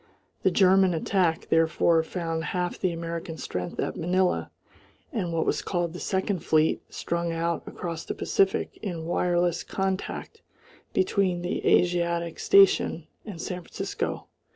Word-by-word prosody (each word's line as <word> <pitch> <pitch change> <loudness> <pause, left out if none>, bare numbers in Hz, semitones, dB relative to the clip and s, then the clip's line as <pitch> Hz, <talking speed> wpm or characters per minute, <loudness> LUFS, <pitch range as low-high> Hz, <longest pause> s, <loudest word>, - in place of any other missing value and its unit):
The 190 - +4
German 190 -1 +4
attack 165 0 0
therefore 165 0 +3
found 165 -1 -3
half 180 +3 -2
the 185 - +1
American 165 -1 -5
strength 90 -10 -5
at - - -1
Manila, 180 +2 +1 0.6
and 190 -8 -1
what 165 -1 0
was - - 0
called 175 -3 -2
the 175 - -7
Second 190 0 -1
Fleet 160 -1 +2
strung 170 0 -2
out 165 0 -1
across 165 -2 -5
the - - -5
Pacific 195 -1 0
in 170 -6 -4
wireless 175 0 +1
contact 190 0 -3 0.5
between 185 -2 +1
the 175 - -2
Asiatic 170 -1 +2
station 195 -4 +4 0.2
and 195 -6 -7
San 180 +2 -4
Francisco. - - -4
175 Hz, 135 wpm, -26 LUFS, 165-185 Hz, 0.6 s, The